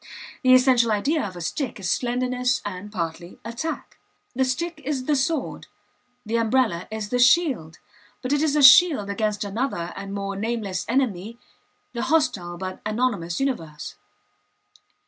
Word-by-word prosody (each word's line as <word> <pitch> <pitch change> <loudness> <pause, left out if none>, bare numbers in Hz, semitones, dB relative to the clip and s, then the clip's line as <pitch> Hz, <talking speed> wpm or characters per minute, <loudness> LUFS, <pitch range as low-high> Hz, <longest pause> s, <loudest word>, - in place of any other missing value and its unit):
The 255 -1 +6
essential 250 -3 +4
idea 280 +10 +1
of 190 -3 -5
a 175 - -7
stick 245 - -3
is 180 -3 -2
slenderness 250 0 0
and, 205 +1 -6
partly, 170 -2 -5
attack. 235 +8 -5 0.4
The 265 - +2
stick 310 +5 -2
is 265 -2 -2
the 300 - +2
sword, 285 +1 -2 0.6
the 225 +2 0
umbrella 225 -6 +1
is 215 -1 -5
the 245 - 0
shield, 250 - +3 0.5
but 255 +3 0
it 290 - +2
is 305 -2 +1
a 295 - +3
shield 275 - +7
against 210 0 -1
another 200 -4 -3
and 195 0 -7
more 200 0 -4
nameless 205 -3 -3
enemy 230 -4 -1 0.6
the 235 - -3
hostile 255 - 0
but 185 +1 -6
anonymous 215 -6 -1
universe. 165 - -3
235 Hz, 145 wpm, -24 LUFS, 195-265 Hz, 0.6 s, shield